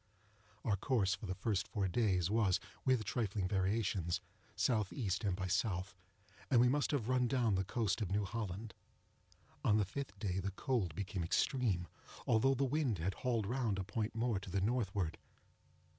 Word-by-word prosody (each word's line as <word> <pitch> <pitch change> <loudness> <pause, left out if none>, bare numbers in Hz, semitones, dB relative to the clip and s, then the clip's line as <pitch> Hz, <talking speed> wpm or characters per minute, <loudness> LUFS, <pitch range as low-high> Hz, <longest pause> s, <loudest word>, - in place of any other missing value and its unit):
Our 100 -3 +2
course 100 -4 +2
for 100 - -5
the 95 - -2
first 100 -1 -1
four 100 -4 -1
days 95 -3 +1
was, 105 -5 +3 0.2
with 130 -4 +3
trifling 100 -3 -1
variations, 95 -3 0 0.4
S.E. 110 0 +1
and 100 -3 +1
by 95 0 -3
S.; 90 - +2 0.9
and 125 - +5
we 125 - +6
must 145 +2 +2
have 135 -7 0
run 125 -1 +3
down 120 -4 +2
the 95 0 +2
coast 105 0 0
of 100 - -1
New 100 +1 +1
Holland. 105 0 -4 0.9
On 105 - +4
the 105 - +2
fifth 105 0 -5
day 95 -2 -1
the 95 +1 -1
cold 100 - -1
became 95 -1 -3
extreme, 95 - +1 0.4
although 135 +5 +4
the 135 +2 +1
wind 135 -5 +1
had 90 +4 -1
hauled 115 -2 0
round 115 -3 0
a 95 - -1
point 105 +3 -3
more 115 -3 +1
to 95 - -9
the 100 +2 0
northward. 100 -5 0
105 Hz, 175 wpm, -36 LUFS, 95-120 Hz, 0.9 s, we